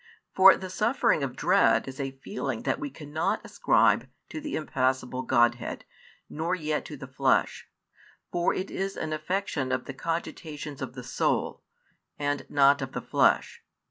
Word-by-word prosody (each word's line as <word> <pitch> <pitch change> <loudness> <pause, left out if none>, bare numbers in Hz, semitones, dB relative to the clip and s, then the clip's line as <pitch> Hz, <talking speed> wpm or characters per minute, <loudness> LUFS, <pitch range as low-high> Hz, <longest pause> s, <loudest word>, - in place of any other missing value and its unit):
For 190 0 +8
the 185 -1 -7
suffering 215 - +2
of 130 -2 -3
dread 115 -2 +3
is 135 +1 -8
a 135 -1 -2
feeling 135 - -4
that - - 0
we 145 - -4
cannot 150 +3 -2
ascribe - - +2 0.2
to 310 - -6
the 300 -1 -4
impassible 130 -3 -1
Grodhead, 120 -2 +1 0.4
nor 165 +4 -2
yet 155 -3 -2
to 150 - -8
the 135 - -8
Flesh; 135 0 0 0.6
for 175 0 +1
it 185 - -4
is 195 +1 -3
an 155 0 -3
affection 155 -5 -2
of - - -1
the 135 - -6
cogitations 150 -1 -5
of 130 -2 -5
the 125 -1 -8
soul, - - -1 0.6
and 145 0 -2
not 140 0 +4
of 130 0 -5
the - - -3
flesh. - - +2
145 Hz, 160 wpm, -27 LUFS, 130-170 Hz, 0.6 s, For